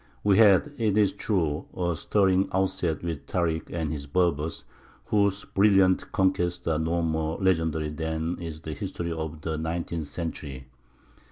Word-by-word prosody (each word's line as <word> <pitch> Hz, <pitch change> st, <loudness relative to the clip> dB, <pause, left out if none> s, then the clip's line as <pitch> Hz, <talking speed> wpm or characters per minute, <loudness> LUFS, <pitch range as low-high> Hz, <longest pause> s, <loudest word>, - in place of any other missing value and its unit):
We 100 Hz, 0 st, +4 dB
had, 105 Hz, +6 st, +6 dB
it 105 Hz, -3 st, +1 dB
is 105 Hz, -3 st, +4 dB
true, 80 Hz, -8 st, -1 dB
a 85 Hz, -2 st, 0 dB
stirring 95 Hz, +2 st, +2 dB
outset 95 Hz, -4 st, 0 dB
with 80 Hz, -5 st, -4 dB
Tārik 80 Hz, -3 st, -1 dB
and 80 Hz, -2 st, -2 dB
his 70 Hz, -2 st, -5 dB
Berbers, 80 Hz, -2 st, 0 dB, 0.4 s
whose 100 Hz, -1 st, +1 dB
brilliant 95 Hz, -2 st, +3 dB
conquests 90 Hz, -2 st, +1 dB
are 80 Hz, -1 st, +1 dB
no 85 Hz, +1 st, 0 dB
more 80 Hz, 0 st, -1 dB
legendary 80 Hz, -5 st, +1 dB
than 80 Hz, +2 st, -3 dB
is 80 Hz, -2 st, -6 dB
the 80 Hz, -1 st, -5 dB
history 85 Hz, +1 st, -4 dB
of 80 Hz, -1 st, -5 dB
the 80 Hz, -1 st, -3 dB
nineteenth 80 Hz, -1 st, -3 dB
century. 70 Hz, -4 st, -6 dB
85 Hz, 150 wpm, -27 LUFS, 80-95 Hz, 0.4 s, had